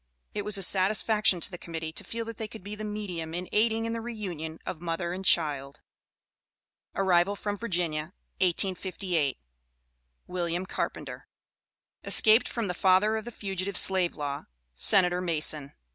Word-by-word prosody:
It 205 Hz, -, -3 dB
was 210 Hz, 0 st, +1 dB
a 195 Hz, -, +2 dB
satisfaction 200 Hz, 0 st, +3 dB
to -, -, +3 dB
the 175 Hz, -, -8 dB
Committee 165 Hz, -1 st, -6 dB
to -, -, -4 dB
feel 230 Hz, 0 st, -5 dB
that 230 Hz, -2 st, -7 dB
they 220 Hz, -, -4 dB
could 215 Hz, -2 st, -12 dB
be 205 Hz, +2 st, -7 dB
the 210 Hz, 0 st, -6 dB
medium 185 Hz, -6 st, -5 dB
in 180 Hz, +1 st, -4 dB
aiding 225 Hz, +1 st, +2 dB
in 230 Hz, -, -2 dB
the 230 Hz, -, -3 dB
reunion 180 Hz, -9 st, -6 dB
of 165 Hz, -, -5 dB
mother 170 Hz, 0 st, -3 dB
and 190 Hz, +1 st, -5 dB
child. 145 Hz, -6 st, +2 dB, 1.2 s
ARRIVAL 190 Hz, 0 st, +2 dB
FROM 205 Hz, 0 st, -3 dB
VIRGINIA, 175 Hz, -8 st, -1 dB, 0.3 s
1858. 180 Hz, -4 st, 0 dB, 0.9 s
WILLIAM 175 Hz, 0 st, -3 dB
CARPENTER. -, -, -5 dB, 0.8 s
Escaped 220 Hz, +2 st, +5 dB
from 230 Hz, -4 st, -3 dB
the 180 Hz, -, -2 dB
Father 190 Hz, +4 st, +3 dB
of 220 Hz, 0 st, -4 dB
the 240 Hz, -, -6 dB
Fugitive 195 Hz, -2 st, -3 dB
Slave 185 Hz, -2 st, +4 dB
Law 145 Hz, -1 st, -4 dB, 0.3 s
Senator 180 Hz, -, +4 dB
Mason. 155 Hz, -4 st, +2 dB
185 Hz, 155 wpm, -28 LUFS, 170-210 Hz, 1.2 s, Escaped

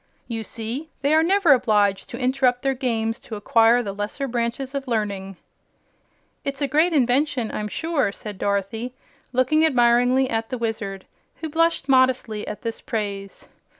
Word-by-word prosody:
You 225 Hz, -2 st, -4 dB
see 235 Hz, +9 st, -5 dB
they 285 Hz, +2 st, +3 dB
are 315 Hz, -, +5 dB
never 355 Hz, -2 st, +5 dB
obliged 210 Hz, -6 st, +2 dB
to 240 Hz, -, -6 dB
interrupt 255 Hz, -1 st, +1 dB
their 270 Hz, 0 st, +2 dB
games 230 Hz, -3 st, -1 dB
to 220 Hz, -, -8 dB
acquire 225 Hz, +3 st, +4 dB
the 200 Hz, -3 st, -4 dB
lesser 210 Hz, +7 st, -3 dB
branches 240 Hz, +2 st, -2 dB
of 275 Hz, -1 st, -4 dB
learning." 200 Hz, -5 st, -2 dB, 1.1 s
"It's 275 Hz, -1 st, -4 dB
a 285 Hz, -, 0 dB
great 310 Hz, +6 st, +3 dB
invention, 255 Hz, -3 st, +1 dB
I'm 210 Hz, -, -3 dB
sure," 320 Hz, -1 st, -1 dB
said 205 Hz, -1 st, -9 dB
Dorothy, 205 Hz, +5 st, -2 dB, 0.4 s
looking 255 Hz, +5 st, +3 dB
admiringly 250 Hz, -2 st, +4 dB
at 225 Hz, -1 st, -2 dB
the 255 Hz, -, -3 dB
Wizard, 220 Hz, -4 st, -4 dB, 0.3 s
who 320 Hz, -, -6 dB
blushed 330 Hz, -2 st, +1 dB
modestly 255 Hz, -5 st, +2 dB
at 210 Hz, -, -6 dB
this 230 Hz, -1 st, -4 dB
praise. 200 Hz, -3 st, -5 dB
245 Hz, 155 wpm, -23 LUFS, 215-270 Hz, 1.1 s, are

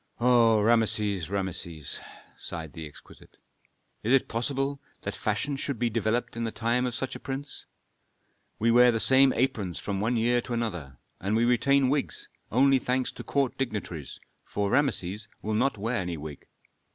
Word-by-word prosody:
"O 120 Hz, -2 st, +5 dB
Rameses, 105 Hz, -5 st, +2 dB
Rameses!" 85 Hz, -6 st, -3 dB, 0.4 s
sighed 80 Hz, -2 st, -7 dB
the 80 Hz, -2 st, -7 dB
exquisite. 75 Hz, -, -16 dB, 0.6 s
"Is 110 Hz, -, -1 dB
it 135 Hz, -1 st, +4 dB
possible 135 Hz, +4 st, -1 dB, 0.2 s
that -, -, -3 dB
fashion 140 Hz, -1 st, -1 dB
should 135 Hz, -1 st, -3 dB
be 120 Hz, 0 st, 0 dB
developed 115 Hz, +2 st, -1 dB
in 115 Hz, -, -3 dB
the 115 Hz, -, -2 dB
time 120 Hz, +3 st, 0 dB
of 120 Hz, -, -3 dB
such 135 Hz, -, -3 dB
a -, -, -7 dB
prince? 140 Hz, +1 st, -7 dB, 0.9 s
We 115 Hz, +2 st, +2 dB
wear 125 Hz, +1 st, +7 dB
the 115 Hz, -, -1 dB
same 135 Hz, +3 st, +6 dB
aprons 110 Hz, -9 st, -1 dB
from 100 Hz, -1 st, -3 dB
one 115 Hz, +3 st, +1 dB
year 120 Hz, +2 st, +2 dB
to 120 Hz, -, -6 dB
another, 90 Hz, -, -3 dB, 0.2 s
and 100 Hz, +3 st, -1 dB
we 115 Hz, +1 st, +3 dB
retain 130 Hz, +3 st, +3 dB
wigs, 145 Hz, 0 st, -1 dB, 0.2 s
only 135 Hz, +3 st, +4 dB
thanks 125 Hz, +1 st, -1 dB
to -, -, -9 dB
court 140 Hz, -3 st, -1 dB
dignitaries, 100 Hz, -, -4 dB, 0.2 s
for 100 Hz, -1 st, -2 dB
Rameses 105 Hz, -7 st, 0 dB, 0.2 s
will 110 Hz, -, -2 dB
not 110 Hz, +3 st, +1 dB
wear 115 Hz, +4 st, -1 dB
any 90 Hz, -4 st, -3 dB
wig. 75 Hz, -1 st, -9 dB
115 Hz, 165 wpm, -27 LUFS, 100-130 Hz, 0.9 s, wear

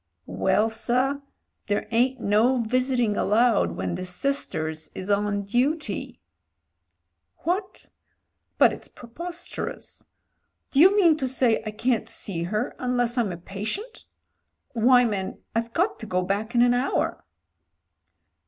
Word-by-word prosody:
"Well, 95 Hz, -, +1 dB
sir, 255 Hz, +5 st, 0 dB, 0.5 s
there 205 Hz, 0 st, -1 dB
ain't 250 Hz, +3 st, +2 dB
no 235 Hz, +5 st, +3 dB
visiting 245 Hz, -1 st, +1 dB
allowed 225 Hz, +2 st, +2 dB
when -, -, -3 dB
the 180 Hz, +1 st, -4 dB
sisters 180 Hz, -, -2 dB
is 190 Hz, +2 st, -4 dB
on 205 Hz, 0 st, +1 dB
duty." 270 Hz, +10 st, -1 dB, 1.2 s
"What? 375 Hz, +4 st, -2 dB, 0.7 s
But -, -, +5 dB
it's -, -, -8 dB
preposterous. 340 Hz, +9 st, -7 dB, 0.6 s
Do 275 Hz, -, +2 dB
you 380 Hz, +6 st, +7 dB
mean 335 Hz, -6 st, +5 dB
to 265 Hz, -4 st, -1 dB
say 250 Hz, -3 st, +2 dB
I -, -, 0 dB
can't 225 Hz, +2 st, -1 dB
see 175 Hz, -5 st, -3 dB
her 215 Hz, +7 st, -2 dB
unless 245 Hz, -1 st, 0 dB
I'm 230 Hz, -6 st, +1 dB
a 175 Hz, -, -5 dB
patient? 215 Hz, -, -6 dB, 0.7 s
Why, 245 Hz, +2 st, +5 dB
man, 200 Hz, -4 st, -3 dB, 0.2 s
I've 230 Hz, +1 st, -1 dB
got 360 Hz, -, 0 dB
to 220 Hz, -, -7 dB
go 185 Hz, -2 st, 0 dB
back 205 Hz, +5 st, -2 dB
in 240 Hz, -, +6 dB
an 245 Hz, 0 st, +4 dB
hour." 250 Hz, +3 st, -1 dB
235 Hz, 130 wpm, -25 LUFS, 205-260 Hz, 1.2 s, you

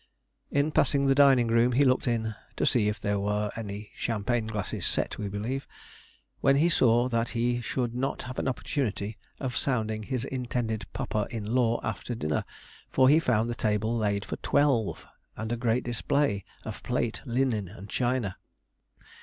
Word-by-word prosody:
In 145 Hz, +2 st, +1 dB
passing 140 Hz, -1 st, +3 dB
the 135 Hz, -, +5 dB
dining 135 Hz, -3 st, +6 dB
room 115 Hz, +2 st, +3 dB
he 140 Hz, +4 st, +4 dB
looked 130 Hz, +1 st, +2 dB
in 110 Hz, -2 st, 0 dB, 0.2 s
(to -, -, +1 dB
see 110 Hz, -4 st, +3 dB
if 105 Hz, +1 st, -3 dB
there 100 Hz, -1 st, 0 dB
were 105 Hz, +1 st, 0 dB
any 105 Hz, -1 st, -6 dB
champaign 115 Hz, +1 st, -1 dB
glasses 105 Hz, -3 st, -3 dB
set, -, -, 0 dB
we 105 Hz, -, -2 dB
believe), 115 Hz, +7 st, -3 dB, 0.7 s
when 135 Hz, 0 st, +4 dB
he 160 Hz, +5 st, +4 dB
saw 120 Hz, -5 st, +4 dB
that 115 Hz, -1 st, 0 dB
he 120 Hz, +1 st, 0 dB
should 120 Hz, -1 st, -2 dB
not 130 Hz, +3 st, -2 dB
have 130 Hz, 0 st, -5 dB
an -, -, -1 dB
opportunity 115 Hz, -5 st, -2 dB, 0.2 s
of 130 Hz, -3 st, -3 dB
sounding 110 Hz, -5 st, 0 dB
his 125 Hz, +3 st, -3 dB
intended 120 Hz, -4 st, -2 dB
papa 105 Hz, -1 st, -2 dB
in 110 Hz, -2 st, -4 dB
law 120 Hz, -2 st, +3 dB
after 115 Hz, +2 st, -3 dB
dinner, 75 Hz, -8 st, -1 dB, 0.4 s
for 130 Hz, 0 st, +5 dB
he 155 Hz, +3 st, +6 dB
found 115 Hz, -7 st, +2 dB
the 120 Hz, -, -2 dB
table 110 Hz, 0 st, 0 dB
laid 100 Hz, -3 st, 0 dB
for -, -, -4 dB
twelve, 135 Hz, -7 st, +1 dB, 0.3 s
and 110 Hz, +1 st, -4 dB
a -, -, +1 dB
great 120 Hz, 0 st, +1 dB
display 120 Hz, -3 st, 0 dB, 0.2 s
of -, -, -6 dB
plate, -, -, -1 dB
linen, 120 Hz, -5 st, 0 dB
and 100 Hz, +1 st, -10 dB
china. 120 Hz, -4 st, -1 dB
120 Hz, 170 wpm, -28 LUFS, 110-130 Hz, 0.7 s, dining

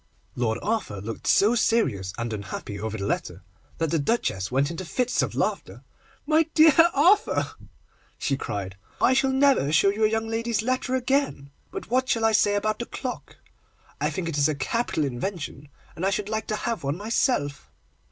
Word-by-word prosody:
Lord 115 Hz, -2 st, 0 dB
Arthur 205 Hz, -, -2 dB
looked 110 Hz, +3 st, -6 dB
so 210 Hz, +4 st, +5 dB
serious 130 Hz, -, +1 dB
and 115 Hz, -1 st, -3 dB
unhappy 100 Hz, 0 st, -6 dB
over 110 Hz, +1 st, -4 dB
the 100 Hz, -, -4 dB
letter, -, -, -3 dB, 0.3 s
that 165 Hz, -2 st, -1 dB
the 165 Hz, -, +2 dB
Duchess 140 Hz, -, -1 dB
went 140 Hz, +4 st, +1 dB
into 170 Hz, +2 st, -5 dB
fits 250 Hz, +8 st, 0 dB
of -, -, -2 dB
laughter. -, -, -2 dB, 0.4 s
'My 315 Hz, +1 st, +3 dB
dear 315 Hz, -1 st, +7 dB, 0.2 s
Arthur,' 365 Hz, +9 st, +3 dB, 0.7 s
she 140 Hz, -, 0 dB
cried, 100 Hz, -6 st, -5 dB, 0.2 s
'I 260 Hz, -, +4 dB
shall 270 Hz, 0 st, +2 dB
never 265 Hz, -, +3 dB
show 155 Hz, +6 st, +4 dB
you 210 Hz, +2 st, -1 dB
a 215 Hz, -, +5 dB
young 225 Hz, 0 st, -1 dB
lady's 225 Hz, -1 st, -1 dB
letter 255 Hz, +1 st, 0 dB
again! 260 Hz, -, 0 dB, 0.2 s
But -, -, -8 dB
what 255 Hz, +1 st, +1 dB
shall 225 Hz, -1 st, +2 dB
I 225 Hz, -, +4 dB
say 205 Hz, -1 st, +3 dB
about 215 Hz, +1 st, -1 dB
the 240 Hz, -, -4 dB
clock? 250 Hz, -1 st, -6 dB, 0.7 s
I -, -, +2 dB
think 185 Hz, -3 st, -4 dB
it 155 Hz, -3 st, -2 dB
is 145 Hz, -, +4 dB
a 155 Hz, -, -1 dB
capital 165 Hz, -, -1 dB
invention, 145 Hz, +1 st, -5 dB, 0.3 s
and 170 Hz, -, -6 dB
I 195 Hz, -, +3 dB
should 200 Hz, +1 st, -2 dB
like 220 Hz, 0 st, -2 dB
to 215 Hz, -, -1 dB
have 230 Hz, -6 st, -3 dB
one 140 Hz, +3 st, -1 dB
myself. 205 Hz, -, -1 dB
205 Hz, 185 wpm, -25 LUFS, -, 0.7 s, dear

